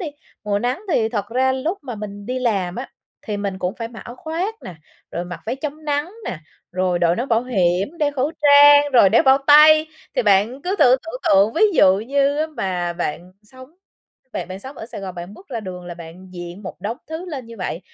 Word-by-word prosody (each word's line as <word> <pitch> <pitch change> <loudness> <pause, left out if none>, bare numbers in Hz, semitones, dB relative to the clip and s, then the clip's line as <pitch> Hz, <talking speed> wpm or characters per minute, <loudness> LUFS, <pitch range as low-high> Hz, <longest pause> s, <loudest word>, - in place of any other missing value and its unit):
đi, 355 - -4 0.4
mùa 205 -1 0
nắng 245 - -2
thì 220 -6 +2
thật 205 -3 -3
ra 260 +2 +1
lúc 310 +9 -2
mà 250 -4 -6
mình 205 -1 -8
đi 255 +2 -2
làm 195 -8 -1
á, 250 +3 -5 0.4
thì 210 - -2
mình 200 -2 -4
cũng 180 +2 -2
phải 230 -1 -5
mặc 230 -2 -11
áo 240 +1 -9
khoác 335 +9 -3
nè, 180 - -8 0.4
rồi 175 - -4
mặc 180 0 -8
váy 240 - -2
chống 300 +2 -6
nắng 295 +3 -1
nè, 175 - -4 0.3
rồi 180 -1 0
đội 170 0 +2
nón 250 +3 -3
bảo 230 0 +2
hiểm, 195 - 0
đeo 295 -1 +1
khẩu 280 +1 -1
trang, 290 0 +7
rồi 235 -6 +7
đeo 225 - +4
bao 265 0 +5
tay. 310 +1 +7 0.3
Thì 255 - +3
bạn 210 +6 +2
cứ 375 +4 -2
thử 250 +1 +6
tưởng 330 +10 -7
tượng 200 +3 +4
ví 330 - +1
dụ 190 -8 +5
như 280 +5 +1
á 310 - +1
mà 185 - -3
bạn 175 +1 -5
sống 255 +4 -15 0.6
bạn - - -4
bạn 185 +1 -7
sống 265 +5 -10
ở 220 - -8
Sài 230 -3 -8
Gòn, 190 -2 -6
bạn 175 +3 -8
bước 385 - -17
ra 240 -5 -4
đường 180 -3 -8
là 175 - -6
bạn 170 +2 -12
diện 175 +2 -8
một 185 - -7
đống 215 +5 -3
thứ 320 +3 -6
lên 275 -8 -6
như 230 - -11
vậy, 180 -2 -4
230 Hz, 235 wpm, -21 LUFS, 190-285 Hz, 0.6 s, trang